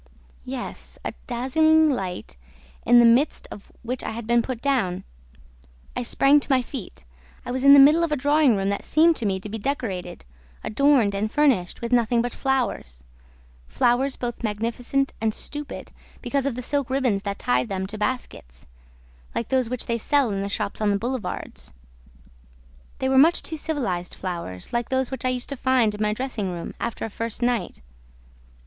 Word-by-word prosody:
Yes, 60 -1 -7
a - - -3
dazzling 315 +6 +3
light 190 - -3 0.5
in 245 - +7
the 240 - +7
midst 245 +6 +3
of 200 - -11
which 250 +2 -4
I - - -3
had 230 0 -6
been 235 +1 +3
put 250 0 -5
down. 245 -10 0 0.9
I - - -1
sprang 275 - +4
to 285 - -5
my 255 -2 +3
feet. 220 - -8 0.4
I - - -4
was 260 +1 -2
in 280 +1 +9
the - - +8
middle 300 +5 +7
of 335 - -1
a - - +2
drawing 290 -2 +3
room 195 0 0
that 200 - -2
seemed 325 +2 +4
to 225 - -1
me 190 -1 -1
to 195 - -8
be 220 +2 -5
decorated, 200 - -4 0.4
adorned 255 -3 +3
and 210 +2 -2
furnished 265 -12 +1
with 235 0 -4
nothing 240 -1 +3
but 240 0 -1
flowers, 245 - -2 0.6
flowers 245 - +1
both 240 -1 -5
magnificent 235 +5 -1
and 220 -1 0
stupid, 295 0 -6 0.3
because 270 +2 0
of 265 - -2
the 250 - -5
silk 280 0 -1
ribbons 255 -7 +1
that 200 0 -4
tied 125 +1 0
them 190 -1 -2
to 200 +3 -7
baskets, 210 - -4 0.7
like 230 - -2
those 260 -3 +1
which 250 -1 -3
they 235 0 -1
sell 280 -1 +2
in 195 -1 -2
the 200 - -3
shops 200 +1 -3
on 210 - +2
the 200 - +2
boulevards. 240 - -5 1.2
They 265 - -1
were 265 0 +4
much 325 +5 +5
too 320 - -5
civilized 240 - -3
flowers, 170 - -6
like 235 0 -1
those 260 -1 0
which 265 - -4
I - - +3
used 250 -1 -3
to 280 - -3
find 255 -4 +2
in 210 - -6
my 210 0 +2
dressing 225 -5 -3
room 170 -1 -6
after 235 -1 -3
a - - -5
first 230 +2 -4
night. 235 - -1
240 Hz, 185 wpm, -24 LUFS, 200-270 Hz, 1.2 s, in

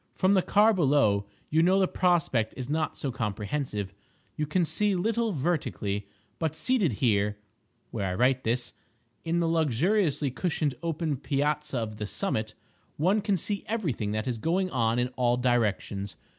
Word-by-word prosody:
From 190 +1 +3
the 190 - +4
car 210 +4 +4
below 135 - +2 0.2
you 160 +1 +4
know 185 +3 +4
the 190 - +3
prospect 160 -14 +1
is 130 +1 -5
not 155 0 -1
so 135 - -2
comprehensive—you 105 +2 -4
can 170 +3 +1
see 205 +4 +1
little 225 +4 0
vertically. 130 - -2 0.3
But 160 -3 -1
seated 220 - +1
here 105 -2 +1 0.5
(where 100 - -2
I 90 - -2
write 130 +4 +2
this) 120 +2 -1 0.5
in 170 +1 0
the 165 - +1
luxuriously 160 - +1
cushioned 155 -1 -1
open 160 -3 -1
piazza 145 +1 -1
of 110 -2 -3
the 105 -1 -4
summit, 110 - -2 0.4
one 190 +8 +2
can 200 -2 +1
see 200 +4 0
everything 160 - -2
that 110 0 -2
is 120 -3 -2
going 185 - 0
on 115 -2 +1
in 125 +1 +1
all 120 -1 +2
directions. 110 -5 0
145 Hz, 155 wpm, -28 LUFS, 115-175 Hz, 0.5 s, the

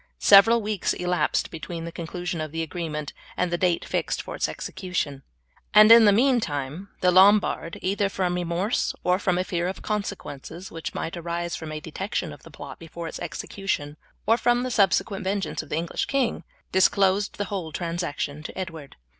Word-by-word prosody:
Several 215 +3 +7
weeks 210 -2 0
elapsed 180 -3 0
between 165 0 -6
the 170 - -6
conclusion 175 0 -4
of 155 -1 -5
the 165 +1 -2
agreement 155 -3 -4 0.2
and 180 -1 0
the 175 - +1
date 180 -2 +1
fixed - - -1
for - - -6
its - - 0
execution, 165 -7 -4 0.5
and 215 +1 +9
in 230 -1 +10
the 205 - +7
meantime 200 - 0
the 180 - +4
Lombard, 190 -2 +4
either 200 +1 +1
from 185 -2 -1
remorse 180 +5 -1
or 180 +1 +2
from 180 -3 +1
a 185 - +1
fear 175 -1 -2
of 190 - -3
the - - -14
consequences 190 -5 -5
which 165 -1 -6
might 165 - -3
arise 170 0 -3
from 160 -1 -7
a 155 - -4
detection 180 +6 -4
of - - -14
the - - -14
plot - - -10
before 165 0 -7
its - - -6
execution, 150 -7 -4 0.3
or 225 +2 +4
from 240 0 +2
the 255 - -3
subsequent 200 -1 +2
vengeance 195 +1 -2
of 155 - -14
the - - -1
English 165 +1 -2
king, 270 -4 0 0.3
disclosed 195 +1 +3
the 205 - -1
whole 185 -5 -4
transaction 165 -3 -3
to 155 - -8
Edward. 165 -7 -6
180 Hz, 185 wpm, -25 LUFS, 165-200 Hz, 0.5 s, in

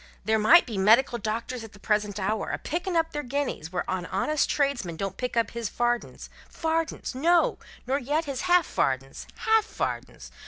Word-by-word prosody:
There 220 +1 +2
might 325 +12 +7
be 220 -6 -4
medical 235 +5 +4
doctors 230 +2 -3
at 225 - -11
the 205 - -15
present 210 -1 0
hour, 210 +3 -1
a - - -2
picking 350 +2 -3
up 325 0 +1
their 295 - -3
guineas 260 - -3
where 180 - -1
a 180 -1 -2
honest 295 +10 +1
tradesman 275 - 0
don't 195 +2 -4
pick 250 -1 -4
up 230 -3 +1
his 230 -3 -3
fardens 240 0 -2 0.2
fardens! 325 -2 -2
no, 335 +6 +2 0.3
nor 265 +3 0
yet 295 +5 -1
his 275 -3 -3
half 355 -2 +5
fardens 135 0 -2
half 445 -1 +3
fardens! - - -5
240 Hz, 185 wpm, -26 LUFS, 210-300 Hz, 0.3 s, might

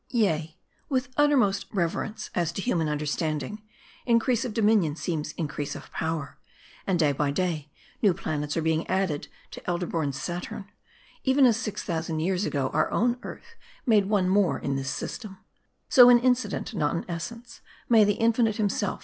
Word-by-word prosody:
Yea, 160 -9 0 0.3
with 260 -3 0
uttermost 250 -10 +3
reverence, 210 +4 -2
as 170 -2 0
to 170 - -6
human 170 -8 0
under 150 0 -2
standing, 155 +5 -2 0.5
increase 235 +1 +3
of 250 - -3
dominion 210 -8 +2
seems 160 -2 -3
increase 150 -3 -4
of - - -10
power; 160 -3 -3 0.5
and 190 -2 +2
day 155 -3 +3
by 140 +1 0
day 155 -1 -2 0.3
new 205 - +5
planets 150 -3 -3
are 165 - 0
being 160 0 0
added 185 -6 -1 0.2
to - - -9
elder 175 0 -1
born 160 -4 -1
Saturns, 175 +7 -5 0.6
even 265 0 +4
as 235 -3 +5
six 215 -2 -4
thousand 165 -2 -2
years 185 +3 0
ago 135 -2 -1
our - - +2
own 240 +3 +1
Earth 465 - -10 0.3
made 210 -6 +4
one 200 -4 +2
more 195 -1 +3
in 140 - -2
this 135 -1 -2
system; 210 +2 -5 0.5
so, 245 -2 +8
in 245 - +8
incident, 250 0 0
not 155 -5 0
in 170 - -3
essence, 230 +8 -7 0.3
may 225 -3 +6
the 205 0 +3
Infinite 225 0 +2
himself. 205 -2 -1
190 Hz, 170 wpm, -26 LUFS, 160-225 Hz, 0.6 s, so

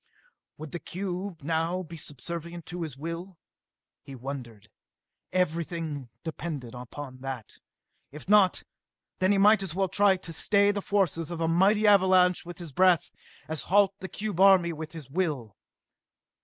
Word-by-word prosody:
Would 155 -2 -8
the 175 - -4
cube 180 -2 -5
now 165 +4 -1
be 165 -1 -10
subservient 170 +3 -6
to 175 +1 -6
his 155 -5 -5
will? 165 +4 -6 0.6
He 135 - -10
wondered. 120 -5 -7 0.6
Everything 165 -6 -2
depended 155 -7 -5
upon 130 +2 -8
that. 130 -4 -7 0.5
If 150 +4 -11
not, 205 -2 +4 0.6
then 185 +1 +3
he 200 - +3
might 210 +2 +6
as 190 -4 -4
well 190 -1 +1
try 200 -1 +4
to 175 -2 -5
stay 200 +4 +4
the 205 0 -3
forces 180 -6 0
of 170 -1 -5
a 165 - +1
mighty 195 +6 +3
avalanche 185 -3 +4
with 175 - -8
his 170 -4 -8
breath, 180 +3 +3 0.4
as 160 -2 -3
halt 200 0 +5
the 190 - -7
cube 205 -4 -4
army 190 -3 +6
with 160 +1 -7
his 160 -5 -9
will. 140 - -2
170 Hz, 155 wpm, -28 LUFS, 150-190 Hz, 0.6 s, might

